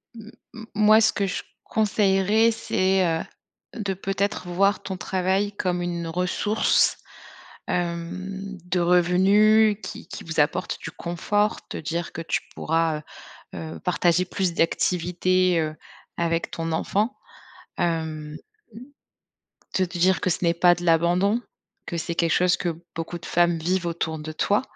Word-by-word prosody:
M 225 Hz, 0 st, -11 dB, 0.2 s
m 220 Hz, -1 st, -8 dB
moi 215 Hz, +1 st, +6 dB
ce 215 Hz, -, +4 dB
que 200 Hz, -, 0 dB
je 185 Hz, -, -3 dB, 0.2 s
conseillerais 210 Hz, +1 st, +2 dB
c'est, 190 Hz, -4 st, +1 dB
heu, 165 Hz, -1 st, 0 dB, 0.5 s
de, 205 Hz, -4 st, -2 dB
peut-être, 195 Hz, 0 st, -2 dB
voir 195 Hz, +3 st, +2 dB
ton 190 Hz, -2 st, -5 dB
travail 190 Hz, +2 st, 0 dB
comme 180 Hz, -3 st, -1 dB
une 170 Hz, -1 st, -3 dB
ressource, 180 Hz, +5 st, +1 dB, 0.7 s
hem, 185 Hz, +3 st, -3 dB
de 180 Hz, 0 st, 0 dB
revenu 195 Hz, +5 st, +4 dB
qui -, -, -8 dB
qui -, -, -8 dB
vous -, -, -6 dB
apporte -, -, 0 dB
du -, -, -6 dB
confort, 205 Hz, +5 st, -1 dB
te -, -, -5 dB
dire 165 Hz, +2 st, -3 dB
que -, -, -6 dB
tu 165 Hz, -, -1 dB
pourras, 165 Hz, -1 st, 0 dB
heu -, -, -11 dB, 0.7 s
heu, -, -, -9 dB
partager 180 Hz, 0 st, +2 dB
plus 185 Hz, -1 st, -1 dB
d'activités, 180 Hz, +1 st, +1 dB
heu, 155 Hz, -1 st, -2 dB, 0.4 s
avec 170 Hz, -1 st, -1 dB
ton 165 Hz, 0 st, -3 dB
enfant. 210 Hz, +9 st, 0 dB, 0.6 s
Hem, 155 Hz, -3 st, -2 dB, 1.4 s
te 190 Hz, -, +2 dB
dire 180 Hz, +1 st, +1 dB
que -, -, +1 dB
ce 170 Hz, -, 0 dB
n'est 170 Hz, -1 st, +3 dB
pas 175 Hz, +1 st, +5 dB
de 175 Hz, 0 st, -7 dB
l'abandon, 175 Hz, +7 st, +3 dB, 0.4 s
que 170 Hz, -, -4 dB
c'est 170 Hz, +1 st, -3 dB
quelque 165 Hz, -1 st, +1 dB
chose 180 Hz, +2 st, +3 dB
que 170 Hz, -2 st, -3 dB
beaucoup 165 Hz, +1 st, -5 dB
de 170 Hz, -, -11 dB
femmes 175 Hz, -1 st, +2 dB
vivent 175 Hz, +2 st, -1 dB
autour 160 Hz, -1 st, -2 dB
de 155 Hz, +1 st, -6 dB
toi. 200 Hz, +8 st, +1 dB
180 Hz, 150 wpm, -24 LUFS, 170-195 Hz, 1.4 s, moi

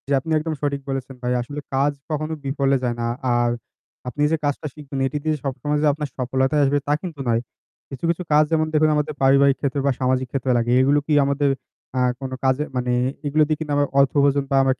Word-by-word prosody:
জ্বী, -, -, -5 dB
আপনি 160 Hz, +5 st, -6 dB
একদম 160 Hz, +1 st, -3 dB
সঠিক 140 Hz, -1 st, -1 dB
বলেছেন 135 Hz, 0 st, -4 dB
ভাই। 125 Hz, 0 st, 0 dB
আসলে 145 Hz, +5 st, -6 dB, 0.2 s
কাজ 140 Hz, +2 st, +3 dB, 0.2 s
কখনো 155 Hz, +1 st, -2 dB
বিফলে 140 Hz, 0 st, +1 dB
যায় 120 Hz, -1 st, 0 dB
না। 115 Hz, -, 0 dB, 0.3 s
আর 120 Hz, 0 st, +2 dB, 0.6 s
আপনি 145 Hz, +4 st, -4 dB
যে 160 Hz, -, +2 dB
কাজটা 145 Hz, +1 st, -1 dB
শিখবেন, 140 Hz, -2 st, -7 dB
এটি 135 Hz, -, -3 dB
দিয়ে 155 Hz, -1 st, +1 dB
সবসময় 145 Hz, +2 st, -1 dB
যে -, -, +4 dB
আপনার 150 Hz, 0 st, -4 dB
সফলতাই 130 Hz, +3 st, +1 dB
আসবে 140 Hz, +1 st, +2 dB
তা 145 Hz, -, +3 dB
কিন্তু 170 Hz, -6 st, -7 dB
নয়। 115 Hz, 0 st, +2 dB, 0.5 s
কিছু, 135 Hz, +4 st, -9 dB
কিছু 170 Hz, +2 st, 0 dB
কাজ 150 Hz, +1 st, +6 dB
যেমন 155 Hz, -1 st, +2 dB
দেখুন 155 Hz, 0 st, +4 dB
আমাদের 150 Hz, +1 st, -1 dB
পারিবারিক 135 Hz, 0 st, +5 dB
ক্ষেত্রে 140 Hz, 0 st, -1 dB
বা 140 Hz, -, +4 dB
সামাজিক 130 Hz, 0 st, +1 dB
ক্ষেত্রে 135 Hz, -1 st, 0 dB
লাগে। 120 Hz, 0 st, 0 dB
এগুলো 140 Hz, +3 st, +4 dB
কি 155 Hz, -, +1 dB
আমাদের 140 Hz, +1 st, +1 dB, 0.5 s
আ -, -, +2 dB, 0.2 s
কোনো 130 Hz, -1 st, -4 dB
কাজে 130 Hz, +2 st, +2 dB
মানে 125 Hz, -1 st, 0 dB, 0.4 s
এগুলো 155 Hz, +2 st, +3 dB
দিয়ে 155 Hz, -1 st, 0 dB
কিন্তু 155 Hz, -2 st, -4 dB
আমরা 145 Hz, 0 st, +2 dB
অর্থ 140 Hz, -1 st, +4 dB
উপার্জন 140 Hz, 0 st, +2 dB
বা -, -, +3 dB
আমরা 135 Hz, 0 st, +3 dB
140 Hz, 220 wpm, -22 LUFS, 130-150 Hz, 0.6 s, কাজ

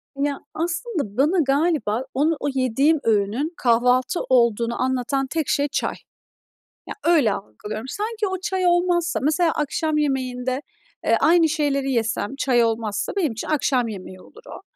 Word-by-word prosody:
Ya, 280 Hz, 0 st, -1 dB
aslında 335 Hz, -, -3 dB
bana 310 Hz, +8 st, +3 dB
galiba 275 Hz, -6 st, +1 dB
onu, 305 Hz, +4 st, +1 dB
o -, -, -2 dB
yediğim 270 Hz, +4 st, +2 dB
öğünün 225 Hz, -, 0 dB
kahvaltı 250 Hz, +6 st, +2 dB
olduğunu 235 Hz, -2 st, +2 dB
anlatan 260 Hz, +1 st, 0 dB
tek 315 Hz, +1 st, -2 dB
şey 285 Hz, 0 st, +2 dB
çay. -, -, -1 dB, 0.9 s
Ya, -, -, -6 dB
öyle 305 Hz, -11 st, +4 dB
algılıyorum. 210 Hz, -, -7 dB
Sanki 425 Hz, -, -3 dB
o 375 Hz, -1 st, -3 dB
çay 375 Hz, 0 st, -1 dB
olmazsa 350 Hz, -1 st, +2 dB
Mesela 320 Hz, +3 st, +2 dB
akşam 305 Hz, +1 st, -1 dB
yemeğinde, 260 Hz, -2 st, -1 dB, 0.4 s
eee, -, -, +4 dB
aynı 330 Hz, -1 st, +4 dB
şeyleri 285 Hz, -3 st, 0 dB
yesem, 230 Hz, 0 st, -1 dB
çay 250 Hz, -4 st, +3 dB
olmazsa 220 Hz, -2 st, -1 dB
benim 330 Hz, -9 st, +1 dB
için 225 Hz, -, -6 dB
akşam 265 Hz, -5 st, +1 dB
yemeği 185 Hz, -3 st, -8 dB
olur 460 Hz, -, -17 dB
o. -, -, -9 dB
275 Hz, 145 wpm, -22 LUFS, 235-320 Hz, 0.9 s, öyle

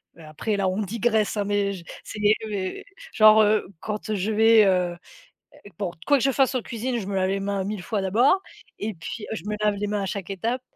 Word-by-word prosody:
mais 165 Hz, -, -14 dB
après 180 Hz, +8 st, -3 dB
là 195 Hz, -1 st, +1 dB
on 195 Hz, +3 st, -2 dB
digresse 220 Hz, +1 st, 0 dB
hein, 205 Hz, -, +1 dB
mais 200 Hz, -1 st, 0 dB
j 180 Hz, -, -9 dB, 0.2 s
c'est, -, -, -8 dB
heu, 215 Hz, +1 st, +2 dB
mais, 190 Hz, -3 st, -4 dB, 0.3 s
genre, 215 Hz, -1 st, +7 dB
heu, 210 Hz, -1 st, +2 dB
quand, 210 Hz, 0 st, -5 dB
heu, 215 Hz, -, 0 dB
je 200 Hz, +3 st, -1 dB
vais, 220 Hz, 0 st, +6 dB
heu, 180 Hz, -2 st, +2 dB, 0.5 s
heu 205 Hz, -, -17 dB
bon, 190 Hz, -4 st, -2 dB, 0.2 s
quoi 285 Hz, -, +5 dB
que -, -, -1 dB
je 275 Hz, -, +4 dB
fasse 270 Hz, 0 st, +2 dB
en 255 Hz, -, +1 dB
cuisine, 235 Hz, +1 st, -3 dB
je 190 Hz, -, -6 dB
me 200 Hz, -, -4 dB
lave 185 Hz, 0 st, +1 dB
les 195 Hz, 0 st, -1 dB
mains 200 Hz, -1 st, -2 dB
1000 200 Hz, -2 st, -4 dB
fois 210 Hz, 0 st, -2 dB
d'abord 240 Hz, -, +3 dB, 0.4 s
et 215 Hz, +1 st, -3 dB
puis, 180 Hz, +6 st, -7 dB
heu, -, -, -2 dB
je -, -, -8 dB
me 210 Hz, 0 st, -2 dB
lave 210 Hz, -1 st, +3 dB
les 205 Hz, -, -2 dB
mains 205 Hz, 0 st, -1 dB
à 195 Hz, -, -2 dB
chaque 190 Hz, 0 st, -5 dB
étape 230 Hz, +7 st, -2 dB
210 Hz, 250 wpm, -24 LUFS, 195-220 Hz, 0.5 s, genre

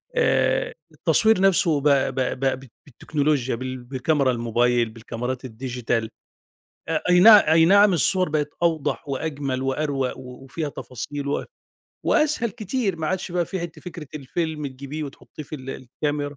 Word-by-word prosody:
آآ، -, -, +2 dB, 0.2 s
التصوير 220 Hz, -3 st, +3 dB
نفسُه 175 Hz, -6 st, +3 dB
ب -, -, -11 dB
ب 135 Hz, -2 st, +2 dB
ب 130 Hz, 0 st, -1 dB, 0.2 s
ب 135 Hz, -, -13 dB, 0.2 s
بالتكنولوجيا 140 Hz, -1 st, -1 dB
بال 130 Hz, +2 st, -5 dB
بالكاميرا 135 Hz, +2 st, +1 dB
الموبايل 120 Hz, 0 st, +1 dB
بالكاميرات 120 Hz, +3 st, -5 dB
الديجيتال 120 Hz, -2 st, -3 dB, 0.8 s
آآ، 160 Hz, -1 st, -1 dB
أي 180 Hz, 0 st, +6 dB
نعم 210 Hz, +2 st, +10 dB
أي 160 Hz, +1 st, +5 dB
نعم 200 Hz, +2 st, +6 dB
الصور 185 Hz, +2 st, +2 dB
بقِت 150 Hz, -1 st, 0 dB
أوضح 155 Hz, -4 st, 0 dB
وأجمل 140 Hz, -2 st, -3 dB
وأروَق، 135 Hz, -1 st, -1 dB
وفيها 135 Hz, +4 st, -6 dB
تفاصيل 140 Hz, +2 st, -6 dB
و 140 Hz, -, -1 dB, 0.6 s
وأسهل 295 Hz, -7 st, +2 dB
كتير 210 Hz, -1 st, -2 dB
ما 160 Hz, -1 st, -3 dB
عادش 185 Hz, 0 st, -2 dB
بقى 175 Hz, -1 st, +1 dB
في 190 Hz, -, -4 dB
حتّة 170 Hz, -2 st, -7 dB
فكرة 170 Hz, -3 st, -8 dB
الفيلم 150 Hz, +1 st, -3 dB
تجيبيه 140 Hz, +3 st, -6 dB
وتحطّيه 145 Hz, +2 st, -10 dB
في 150 Hz, -, -9 dB
ال 135 Hz, -2 st, -7 dB
الكاميرا. 145 Hz, +3 st, -4 dB
145 Hz, 145 wpm, -23 LUFS, 130-170 Hz, 0.8 s, نعم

